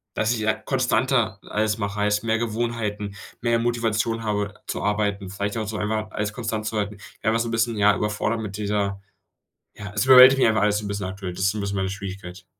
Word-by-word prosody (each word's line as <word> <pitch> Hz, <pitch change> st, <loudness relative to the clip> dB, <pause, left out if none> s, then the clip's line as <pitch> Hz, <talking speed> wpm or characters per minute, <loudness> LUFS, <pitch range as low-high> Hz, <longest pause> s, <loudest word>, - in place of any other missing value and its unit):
Dass 110 Hz, +1 st, +1 dB
ich, 115 Hz, -, -3 dB
ja, 110 Hz, 0 st, +2 dB
konstanter 125 Hz, -1 st, +1 dB
alles 105 Hz, 0 st, -1 dB
mache, 100 Hz, 0 st, -3 dB
heißt, 105 Hz, +1 st, +1 dB
mehr 115 Hz, -1 st, +1 dB
Gewohnheiten, 110 Hz, -3 st, -2 dB, 0.3 s
mehr 115 Hz, -1 st, +2 dB
Motivation 115 Hz, -1 st, 0 dB
habe 105 Hz, -2 st, -1 dB
zu -, -, -3 dB
arbeiten. 100 Hz, -2 st, -1 dB
Vielleicht 100 Hz, +3 st, -3 dB
auch 110 Hz, -2 st, -2 dB
so 105 Hz, 0 st, -4 dB
einmal, 110 Hz, +1 st, -1 dB
alles 105 Hz, 0 st, -3 dB
konstant 110 Hz, -2 st, -3 dB
zu 110 Hz, 0 st, -2 dB
halten. 105 Hz, 0 st, -2 dB, 0.3 s
Ja, 110 Hz, -, +3 dB
einfach 115 Hz, 0 st, +2 dB
so 115 Hz, 0 st, -2 dB
bisschen, 115 Hz, -1 st, 0 dB
ja, 105 Hz, 0 st, +5 dB
überfordert 105 Hz, +2 st, -1 dB
mit 100 Hz, -2 st, -5 dB
dieser 100 Hz, -2 st, -1 dB, 0.7 s
ja, 105 Hz, -1 st, -8 dB
es 105 Hz, -, +1 dB
überwältigt 130 Hz, +1 st, +9 dB
mich -, -, +5 dB
einfach 110 Hz, -1 st, +2 dB
alles 105 Hz, 0 st, +2 dB
so 105 Hz, -, -7 dB
'n -, -, -3 dB
bisschen 100 Hz, -1 st, -3 dB
aktuell. 95 Hz, -1 st, -6 dB
Das 95 Hz, -, -4 dB
ist 95 Hz, -, +4 dB
so 110 Hz, -, -6 dB
'n -, -, -2 dB
bisschen 100 Hz, 0 st, -3 dB
meine 95 Hz, 0 st, -1 dB
Schwierigkeit. 95 Hz, -2 st, -7 dB
105 Hz, 225 wpm, -24 LUFS, 100-115 Hz, 0.7 s, überwältigt